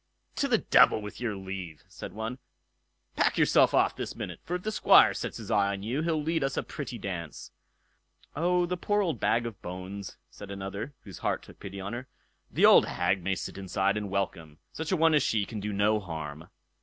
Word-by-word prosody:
"To 280 - +1
the 240 -4 +4
devil 125 - +5
with 105 +2 -8
your 115 -4 -1
leave", 95 -4 -7
said - - -9
one. 110 +4 -5 0.8
"Pack - - +2
yourself - - +5
off - - +3
this - - -5
minute, - - -6
for 175 - -3
if 180 - -4
the 215 - -1
Squire - - +6
sets - - -4
his - - -7
eye 100 -1 +3
on 100 0 -6
you, 125 +8 -1
he'll 160 -1 0
lead 160 0 0
us 135 0 -1
a - - 0
pretty 135 -4 -6
dance." 90 -7 -6 0.8
"Oh! 175 +3 +2
the 180 +1 -2
poor 205 +3 +1
old 170 -5 -2
bag 115 0 +2
of 115 -4 -7
bones", 95 +2 -7
said 100 - -10
another, 100 +7 -5
whose 95 -5 -10
heart - - -1
took - - -15
pity 100 0 -7
on 100 +3 -5
her, 125 +2 -6 0.4
"the - - +3
old - - +7
hag 95 0 0
may 95 +2 0
sit - - -6
inside 95 +1 0
and 105 -1 -3
welcome; 85 -6 -3 0.2
such 160 +2 -4
a 185 - +2
one 165 0 +4
as 150 - +5
she 110 -5 +1
can 110 0 -6
do 105 +1 -3
no 105 +2 +2
harm." 80 -4 -7
105 Hz, 215 wpm, -29 LUFS, 95-145 Hz, 0.8 s, old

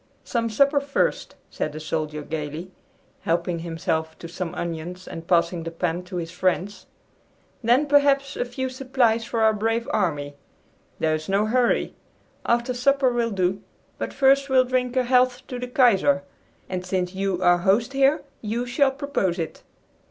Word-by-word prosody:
"Some 230 -1 -1
supper 280 +6 +3
first," 280 0 -1 0.2
said 155 - -3
the 155 - -6
soldier 155 -1 -3
gayly, 155 +4 -5 0.5
helping 170 +1 -1
himself 165 -1 -2
to 170 - -8
some 170 0 -5
onions 175 +2 -5
and 165 0 -8
passing 170 0 +2
the 165 - -4
pan 170 +1 -2
to 180 - -8
his 165 -1 -4
friends. 185 +2 -1 0.8
"Then, 245 +6 +4
perhaps, 280 -1 +3
a - - 0
few 250 +2 -4
supplies 255 -3 +1
for 230 -1 -2
our 220 0 +5
brave 225 +2 -1
army. 145 -7 -1 0.6
There 160 -1 +1
is 155 +2 -4
no 200 +2 +2
hurry. 245 +2 +1 0.5
After 240 +2 +1
supper 265 +1 +2
will 235 -1 0
do; 190 -1 0 0.4
but - - -3
first 275 +1 +3
we'll 260 -1 +5
drink 250 0 -1
a 255 - +4
health 250 0 +2
to 250 - -5
the 250 - -4
Kaiser, 210 -8 +3 0.4
and 185 -1 -4
since 185 0 -2
you 190 -1 -1
are 175 0 +5
host 210 +8 +2
here, 275 +2 +3 0.2
you 230 +3 -2
shall 270 +3 +2
propose 270 - -1
it!" 165 -2 -5
210 Hz, 165 wpm, -24 LUFS, 175-255 Hz, 0.8 s, our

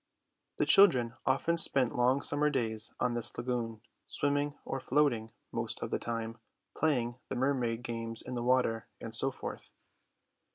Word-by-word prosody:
The - - +2
children 130 - +5
often 150 +6 +2
spent 130 -7 +4
long 125 +3 +2
summer 150 +1 +1
days 115 -6 0
on 125 - +1
this 120 -1 0
lagoon, 120 -2 -3 0.3
swimming 145 0 0
or 135 - -3
floating 125 -6 +1 0.2
most - - -3
of - - -5
the - - 0
time, 115 -1 -4 0.4
playing 125 -6 0
the - - -3
mermaid 125 -3 0
games 115 -1 -4
in 130 - -6
the 120 - -2
water, 120 -3 +1
and 115 - -7
so 135 +4 +3
forth. 135 - -8
125 Hz, 155 wpm, -31 LUFS, 115-135 Hz, 0.4 s, children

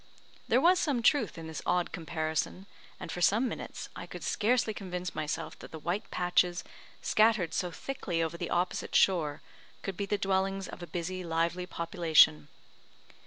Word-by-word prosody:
There - - +4
was 360 +1 +5
some 280 -9 0
truth 235 - +3
in 165 - -7
this 160 -2 -6
odd 180 -1 +1
comparison, 160 +2 -2 0.3
and - - -6
for 175 - -4
some 220 +8 +4
minutes, - - -6
I - - -7
could - - -8
scarcely 225 0 +1
convince 180 -3 -5
myself 155 0 -4
that - - -10
the 160 - -8
white 175 +7 -3
patches 180 0 +1 0.4
scattered 215 -6 +3
so 180 - 0
thickly 180 -3 -4
over 165 +1 -3
the - - -4
opposite 180 +1 -1
shore 160 -6 +3 0.4
could 195 - -3
be 200 - -2
the 205 - +1
dwellings 195 0 0
of - - -9
a 175 - -6
busy, 180 +3 -4
lively 170 +2 -1
population. 165 - +4
180 Hz, 165 wpm, -30 LUFS, 165-200 Hz, 0.4 s, was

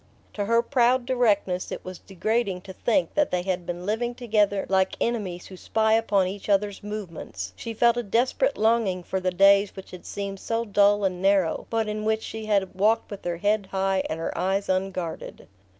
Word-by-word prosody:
To 205 - -2
her 230 +2 +3
proud 250 -1 +2
directness 205 -8 +1
it - - -6
was 185 -1 -7
degrading 200 0 -1
to 190 +1 -10
think 245 +8 0
that 295 -1 +2
they 180 -1 -1
had 180 -2 -2
been 175 +1 -5
living 240 +4 -1
together 210 -5 +1
like 190 0 +1
enemies 200 -7 -2
who 190 - -10
spy 220 +4 +1
upon 210 -4 +2
each 195 +3 -6
other's 205 0 +1
movements: 170 - -6
she 230 - -6
felt 235 +1 +4
a - - +1
desperate 240 - +1
longing 215 -5 +1
for 190 - -2
the 185 0 0
days 195 +2 +4
which 190 - -10
had 180 - -10
seemed 200 -1 -5
so 230 +3 -2
dull 205 -1 +3
and 185 -2 -1
narrow, 195 -4 +2
but 225 -1 0
in 215 0 -3
which 220 0 0
she 220 -1 -6
had 200 -3 +1
walked 210 +5 +1
with 200 - -7
her 175 -1 -2
head 205 +2 0
high 190 0 0
and 160 - -3
her 165 - -3
eyes 195 +2 -1
unguarded. 185 - -3
200 Hz, 200 wpm, -25 LUFS, 185-220 Hz, -, felt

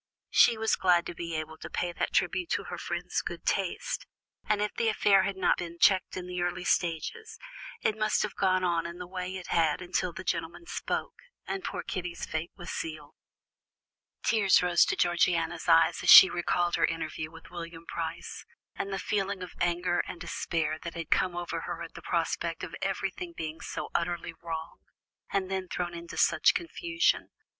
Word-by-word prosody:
She 235 - +6
was 220 0 +2
glad 175 -2 +3
to - - -5
be 170 -1 -5
able 160 0 -5
to - - -8
pay 175 - -2
that - - -2
tribute 360 -2 +1
to - - -1
her - - -6
friend's - - -2
good - - -7
taste. - - -1 0.4
And 210 -1 +3
if 210 0 -1
the 230 -1 +1
affair 205 -2 +4
had 190 0 -2
not 190 - +2
been 170 -1 -6
checked 185 +1 +3
in 180 -1 -5
its 180 0 -4
early 175 +1 -1
stages, 435 - -1 0.4
it 215 - +1
must 215 0 +1
have 210 - -3
gone 185 -1 +2
on 170 -2 +1
in 170 +1 -8
the 180 - -6
way 185 +1 -5
it 180 - -9
had 160 -3 +2
until 180 0 -1
the 185 - -8
gentleman 170 - -3
spoke, - - -3 0.3
and 390 - -4
poor - - -4
Kitty's 180 -3 -4
fate 160 +2 -3
was 175 - -7
sealed. 155 -2 -5 1.1
Tears 200 -5 +4
rose 175 -1 +5
to - - 0
Georgiana's 175 -1 +1
eyes 165 0 +5
as - - 0
she 190 - +12
recalled 175 0 +1
her - - +4
interview 160 -1 -3
with 165 0 -14
William 170 -1 -8
Price, - - -5 0.3
and 195 - -4
the 195 - -1
feeling 200 -2 -1
of 180 - -9
anger 175 +1 +1
and 175 - -7
despair 155 -2 -2
that 170 - -6
had 165 -2 -6
come 180 -2 +2
over 175 0 -3
her - - -4
at - - -9
the - - -10
prospect - - -1
of - - -5
everything 350 -2 -3
being 160 0 -5
so - - -5
utterly 170 -1 -1
wrong, 165 -1 -5 0.5
and 190 -1 -1
then 190 -1 -2
thrown 175 -1 -3
into 170 0 -8
such - - +4
confusion. 340 -1 0
175 Hz, 190 wpm, -29 LUFS, 170-195 Hz, 1.1 s, she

